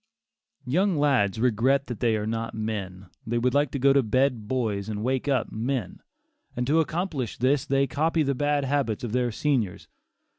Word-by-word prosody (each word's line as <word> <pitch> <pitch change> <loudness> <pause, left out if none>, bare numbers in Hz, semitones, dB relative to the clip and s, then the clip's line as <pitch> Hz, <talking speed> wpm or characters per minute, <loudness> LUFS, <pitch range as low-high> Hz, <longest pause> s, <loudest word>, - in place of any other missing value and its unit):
Young 180 +7 +1
lads 130 -9 +2
regret 125 +4 +2
that 120 -4 -6
they 115 -2 +2
are 105 -1 -2
not 115 +1 -3
men; 100 -4 -4 0.2
they 120 +1 0
would 125 +1 +1
like 145 0 +2
to 140 - -4
go 135 +1 +4
to 140 - +4
bed 125 -1 0
boys 110 -5 -1
and 105 -1 -4
wake 130 +2 -1
up 135 -5 0
men; 120 -2 -3 0.5
and 125 - -1
to 150 +5 +3
accomplish 160 - -2
this 135 +3 +1
they 135 0 +2
copy 160 +3 +1
the 140 -1 0
bad 145 +1 0
habits 135 -6 -1
of 120 - -3
their 125 0 0
seniors. 115 -7 -1
125 Hz, 185 wpm, -26 LUFS, 110-140 Hz, 0.5 s, go